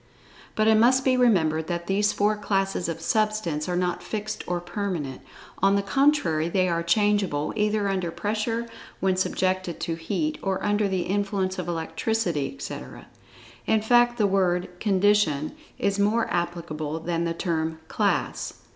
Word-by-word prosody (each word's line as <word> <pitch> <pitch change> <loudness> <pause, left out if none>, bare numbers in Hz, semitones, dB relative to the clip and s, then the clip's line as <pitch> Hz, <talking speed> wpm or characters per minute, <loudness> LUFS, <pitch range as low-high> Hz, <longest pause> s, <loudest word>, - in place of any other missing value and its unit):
But 215 0 +2
it 220 -1 +5
must 255 +3 +4
be 260 -1 +4
remembered 160 -11 +2
that 175 -1 -3
these 205 +3 +2
four 210 +1 +1
classes 195 -4 -1
of 165 - -4
Substance 210 -6 0
are 180 - 0
not 180 0 -1
fixed 215 0 -4
or 175 0 -1
permanent[Pg 175 -6 -4 0.4
63]—on 195 +1 +4
the 200 - +1
contrary 195 - +2
they 185 +1 +2
are 170 -1 0
changeable 195 -4 +1
either 210 -1 +1
under 190 -3 -1
pressure, 220 +5 -2 0.3
when 190 -1 +2
subjected 185 -1 -1
to 165 - -1
heat, 205 - -2
or 190 -1 -2
under 205 0 +2
the 190 -2 -1
influence 195 -1 -1
of 180 - -4
electricity, 170 -1 -1
etc. 275 - -8 0.6
In 220 -1 +2
fact 240 +1 +4
the 215 - +3
word 185 -3 +1
"condition" 195 -7 +2 0.3
is 200 0 0
more 215 +3 +2
applicable 160 -3 -3
than 170 +1 -1
the 165 0 -2
term 160 -2 -1
"class." - - -1
195 Hz, 155 wpm, -25 LUFS, 170-210 Hz, 0.6 s, it